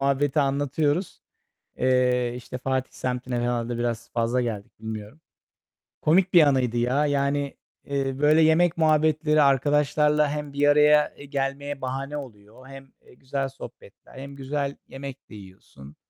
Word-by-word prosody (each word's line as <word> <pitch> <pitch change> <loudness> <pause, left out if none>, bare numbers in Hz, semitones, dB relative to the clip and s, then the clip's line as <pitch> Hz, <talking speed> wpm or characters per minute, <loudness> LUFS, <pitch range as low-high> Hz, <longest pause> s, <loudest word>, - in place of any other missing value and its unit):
muhabbeti 140 +2 +1
anlatıyoruz. 145 +5 -1 0.6
Eee, 125 -1 +2
işte, 125 +1 -8
Fatih 130 0 -2
semtine 125 0 -3
herhâlde 120 0 -2
biraz 120 -1 -3
fazla 120 +2 0
geldik, 110 -4 -4
bilmiyorum. 110 +5 -7 0.8
Komik 180 +4 +3
bir 175 - +8
anıydı 125 -4 +1
ya. 125 +5 +1
Yani, 140 0 -1 0.3
eee, 135 -1 -2
böyle 150 +2 +4
yemek 160 +2 +3
muhabbetleri 155 -1 +3
arkadaşlarla 150 +2 +2
hem 150 -1 -5
bir 145 +1 +2
araya 150 0 +4 0.2
gelmeye 140 0 -3
bahane 135 +3 -4
oluyor, 115 -1 -11
hem, 135 -1 -12
eee, - - -20
güzel 135 +2 -4
sohbetler 125 -1 -13
hem 140 +1 -9
güzel 140 +1 -3
yemek 135 0 -9
de 110 - -11
yiyorsun. 95 -8 -14
135 Hz, 135 wpm, -25 LUFS, 125-150 Hz, 0.8 s, bir